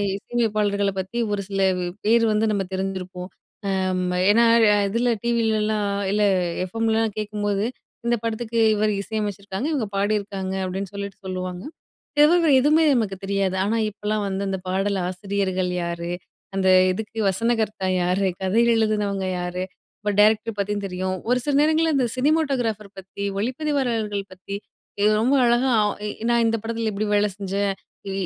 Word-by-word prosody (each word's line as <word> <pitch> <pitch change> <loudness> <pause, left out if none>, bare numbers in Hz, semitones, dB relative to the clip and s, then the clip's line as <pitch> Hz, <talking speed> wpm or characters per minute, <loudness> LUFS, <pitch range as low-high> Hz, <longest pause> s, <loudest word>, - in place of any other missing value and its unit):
இசை 200 - -11
அமைப்பாளர்கள 205 -3 +1
பத்தி, 190 +5 -5
ஒரு 205 -1 -1
சில 195 -1 -2 0.4
பேர் 230 +1 +4
வந்து 215 +1 +2
நம்ம 200 -2 0
தெரிஞ்சிருப்போம், 185 -1 -4 0.5
அம் 185 -1 0 0.3
ஏன்னா, 230 +3 +5 0.4
இதில 235 +4 +1
டிவிலலாம் 215 -3 +1 0.2
இல்லை 210 0 +3 0.4
எஃப்எம்லாம் 225 +2 0
கேக்கும்போது, 205 -1 -1 0.4
இந்த 240 - +3
படத்துக்கு 230 0 -2 0.2
இவரு 210 0 +1
இசை 220 +2 -5
அமச்சுருக்காங்க, 200 +3 -4
இவுங்க 270 -8 0
பாடியிருக்காங்க 200 -2 -1
அப்டின்னு 190 +1 -4
சொல்லிட்டு 200 -1 -6
சொல்லுவாங்க, 185 -1 -4 0.6
இத 295 - +8
தவிர 340 -3 +4
எதுவுமே 305 +4 +4
நமக்கு 215 -6 0
தெரியாது. 195 -1 0
ஆனா 215 +3 0
இப்போலாம் 210 0 -2
வந்து, 195 0 -2
அந்த 190 - -2
பாடல் 195 +1 0
ஆசிரியர்கள் 185 -1 -1
யாரு? 170 0 -4 0.5
அந்த 190 -1 +2 0.2
இதுக்கு 220 +3 -6
வசனகர்த்தா 215 -1 0
யாரு? 180 +2 +1 0.2
கதை 195 +5 +3
எழுதுனவங்க 210 -3 0
யாரு? 180 +1 -3 0.4
இப்போ 210 - -1
டைரக்டர் 215 +1 +3
பத்தியும் 205 0 -1
தெரியும். 185 0 -3
ஒரு 250 - +4
சில 290 - +1
நேரங்கள்ள 315 +1 +3
இந்த 255 -3 +2
சினிமோட்டோகிராஃபர் 255 -8 0
பத்தி, 190 +1 -7 0.2
ஒளிப்பதிவாளர்கள் 240 -5 -1
பத்தி 195 +2 -7 0.5
இ - - +4 0.2
ரொம்ப 260 +4 +3
அழகா 240 +2 +3
அ 210 -1 +2 0.4
நான் 235 0 +3
இந்த 225 0 +2
படத்தில 230 0 -2
இப்டி 210 +1 -2
வேல 205 0 +4
செஞ்சேன், 200 0 -1 0.4
இ - - -3
205 Hz, 145 wpm, -23 LUFS, 195-225 Hz, 0.6 s, இத